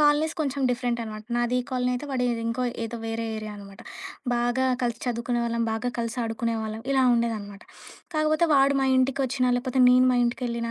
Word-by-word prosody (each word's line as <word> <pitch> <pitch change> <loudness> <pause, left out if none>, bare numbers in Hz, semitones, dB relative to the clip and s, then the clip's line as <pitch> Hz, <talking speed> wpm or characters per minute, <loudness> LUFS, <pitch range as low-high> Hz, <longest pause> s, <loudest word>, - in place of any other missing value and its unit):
Colonies 300 +2 +3
కొంచెం 280 -2 -1
different 240 -1 -1
అనమాట. 215 -1 -7
నాది 240 +1 +1
ఈ - - -4
కాలనీ 250 -1 0
అయితే 290 +4 -4
వాడి 250 -2 0 0.2
ఇంకో 235 +2 -1 0.2
ఏదో 235 +1 -5
వేరే 225 0 -3
ఏరియా 215 -1 -6
అనమాట. 195 -1 -12 0.5
బాగా 240 +2 +1 0.2
కలిసి 235 -1 -1
చదువుకునేవాళ్ళం. 235 -1 -1
బాగా 225 +3 -2
కలిసి 230 +1 -2
ఆడుకునేవాళ్ళం 225 -1 -2
ఇలా 265 -1 +3
ఉండేదనమాట. 215 -4 -2 0.5
కాకపోతే 310 +2 +2
వాడు 275 +1 +4
మా 270 - +2
ఇంటికొచ్చినా 260 -1 +1
లేపోతే 255 +1 0
నేను 255 +1 +6
మా - - +2
ఇంటికెళ్ళినా, 235 -1 -2
240 Hz, 170 wpm, -26 LUFS, 230-260 Hz, 0.5 s, నేను